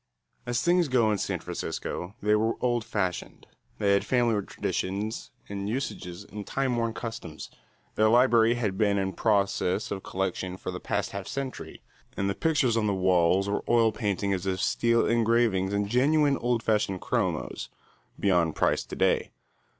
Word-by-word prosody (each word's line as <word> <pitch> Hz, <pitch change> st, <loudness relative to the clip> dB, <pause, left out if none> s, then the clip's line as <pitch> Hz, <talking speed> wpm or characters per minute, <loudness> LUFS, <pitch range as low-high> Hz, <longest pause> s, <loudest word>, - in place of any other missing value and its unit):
As 120 Hz, -1 st, 0 dB
things 175 Hz, -1 st, +3 dB
go 120 Hz, -5 st, +3 dB
in 105 Hz, -, 0 dB
San -, -, -1 dB
Francisco, 90 Hz, +4 st, -5 dB
they 105 Hz, 0 st, +3 dB
were 110 Hz, +2 st, +2 dB
old 120 Hz, -2 st, 0 dB
fashioned. 95 Hz, -5 st, -3 dB, 0.3 s
They 100 Hz, -2 st, +2 dB
had 100 Hz, -, +2 dB
family 120 Hz, -5 st, +1 dB
traditions 100 Hz, +4 st, -3 dB, 0.2 s
and 100 Hz, 0 st, -4 dB
usages 100 Hz, -7 st, -4 dB
and 105 Hz, 0 st, -9 dB
time 135 Hz, -2 st, 0 dB
worn 115 Hz, -1 st, -1 dB
customs. 115 Hz, -9 st, -7 dB, 0.4 s
Their 110 Hz, 0 st, +3 dB
library 120 Hz, -1 st, +5 dB
had 105 Hz, -6 st, -2 dB
been 100 Hz, -2 st, +3 dB
in 95 Hz, -1 st, -1 dB
process 100 Hz, -2 st, +1 dB
of 95 Hz, -, -3 dB
collection 95 Hz, -1 st, -3 dB
for 95 Hz, -, -5 dB
the 90 Hz, -, -6 dB
past 100 Hz, 0 st, -2 dB
half 100 Hz, -1 st, -6 dB
century 135 Hz, -1 st, -6 dB, 0.3 s
and 100 Hz, -, 0 dB
the 100 Hz, -, 0 dB
pictures 135 Hz, -4 st, +1 dB
on 110 Hz, -2 st, +1 dB
the 100 Hz, -, +1 dB
walls 90 Hz, +1 st, +3 dB
were 100 Hz, -, -1 dB
oil 115 Hz, -2 st, +4 dB
paintings 100 Hz, -3 st, -1 dB
of 95 Hz, -1 st, -1 dB
steel 115 Hz, +4 st, +2 dB
engravings 115 Hz, -4 st, +2 dB
and 100 Hz, 0 st, 0 dB
genuine 140 Hz, +5 st, +3 dB
old 120 Hz, -1 st, 0 dB
fashioned 105 Hz, -4 st, 0 dB
chromos, 90 Hz, -, -2 dB, 0.5 s
beyond 90 Hz, -5 st, +2 dB
price -, -, +1 dB
to -, -, -8 dB
day. -, -, +1 dB
105 Hz, 165 wpm, -27 LUFS, 95-120 Hz, 0.5 s, library